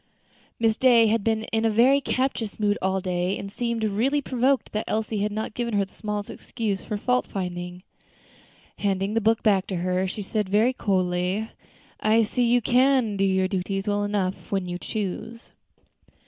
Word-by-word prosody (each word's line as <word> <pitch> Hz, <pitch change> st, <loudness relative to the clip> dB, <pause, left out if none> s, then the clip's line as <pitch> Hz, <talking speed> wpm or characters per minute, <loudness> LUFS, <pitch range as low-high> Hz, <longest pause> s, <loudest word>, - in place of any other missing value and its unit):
Miss 225 Hz, -1 st, +2 dB
Day 240 Hz, -3 st, +6 dB
had 220 Hz, -1 st, +1 dB
been 220 Hz, 0 st, +1 dB
in 225 Hz, 0 st, +2 dB
a 225 Hz, -, +3 dB
very 250 Hz, +6 st, +4 dB
captious 255 Hz, -6 st, -2 dB
mood 205 Hz, -1 st, +2 dB
all 190 Hz, 0 st, 0 dB
day, 180 Hz, +1 st, -1 dB
and 195 Hz, -, -7 dB
seemed 235 Hz, 0 st, -2 dB
really 230 Hz, +8 st, +1 dB
provoked 260 Hz, 0 st, 0 dB
that 215 Hz, -, -2 dB
Elsie 220 Hz, -1 st, -1 dB
had 210 Hz, +1 st, 0 dB
not 215 Hz, +1 st, -4 dB
given 235 Hz, -2 st, -2 dB
her 200 Hz, -1 st, +2 dB
the 190 Hz, -, -23 dB
smallest 210 Hz, -1 st, -4 dB
excuse 210 Hz, -5 st, -4 dB
for 210 Hz, -, -3 dB
fault 250 Hz, +4 st, 0 dB
finding. 180 Hz, -1 st, -5 dB, 1.0 s
Handing 195 Hz, 0 st, 0 dB
the 225 Hz, -, +1 dB
book 225 Hz, +1 st, +2 dB
back 195 Hz, -3 st, +3 dB
to 190 Hz, -, -3 dB
her, 180 Hz, +2 st, 0 dB
she 205 Hz, +2 st, -5 dB
said, 210 Hz, 0 st, -2 dB
very 220 Hz, +6 st, +3 dB
coldly, 185 Hz, 0 st, -1 dB, 0.5 s
"I 220 Hz, +2 st, +3 dB
see 245 Hz, +3 st, 0 dB
you 245 Hz, -1 st, +3 dB
can 250 Hz, -3 st, +3 dB
do 195 Hz, -, 0 dB
your 190 Hz, -1 st, +2 dB
duties 195 Hz, +1 st, -3 dB
well 205 Hz, 0 st, +1 dB
enough 200 Hz, -2 st, -2 dB
when 195 Hz, -2 st, -1 dB
you 175 Hz, 0 st, -4 dB
choose." 220 Hz, +3 st, -5 dB
210 Hz, 180 wpm, -25 LUFS, 190-230 Hz, 1.0 s, Day